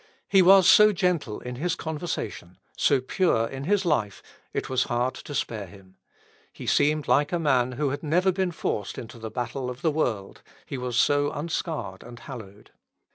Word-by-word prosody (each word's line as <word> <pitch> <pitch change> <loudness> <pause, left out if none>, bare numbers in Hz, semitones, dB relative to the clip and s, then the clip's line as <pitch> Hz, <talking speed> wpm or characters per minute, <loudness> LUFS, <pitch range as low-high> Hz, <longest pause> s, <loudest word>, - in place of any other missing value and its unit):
He 195 -1 +5
was 190 0 +7
so 210 +2 +8
gentle 175 - -1
in 125 0 -6
his 175 +5 -1
conversation, 150 - -5 0.2
so 140 -3 +3
pure 130 -4 +1
in 135 +3 -6
his 200 +2 +1
life, 115 - 0 0.3
it - - -3
was 130 -1 +1
hard 120 +2 0
to 145 - -8
spare 105 -7 -3
him. 95 0 -17 0.6
He - - -10
seemed 150 +1 +2
like 145 +1 +3
a 175 - +1
man 130 -6 +1
who 145 +3 -1
had 145 +1 -4
never 180 +5 +2
been 185 -1 -1
forced 105 - -3
into 115 0 -9
the 110 0 -6
battle 125 +3 -4
of 125 +1 -8
the 160 - +3
world, 115 -10 -2 0.2
he 135 - -5
was 125 -1 -3
so 145 +3 +3
unscarred 155 - -4
and 120 0 -11
hallowed. 105 -6 -11
135 Hz, 185 wpm, -26 LUFS, 120-165 Hz, 0.6 s, so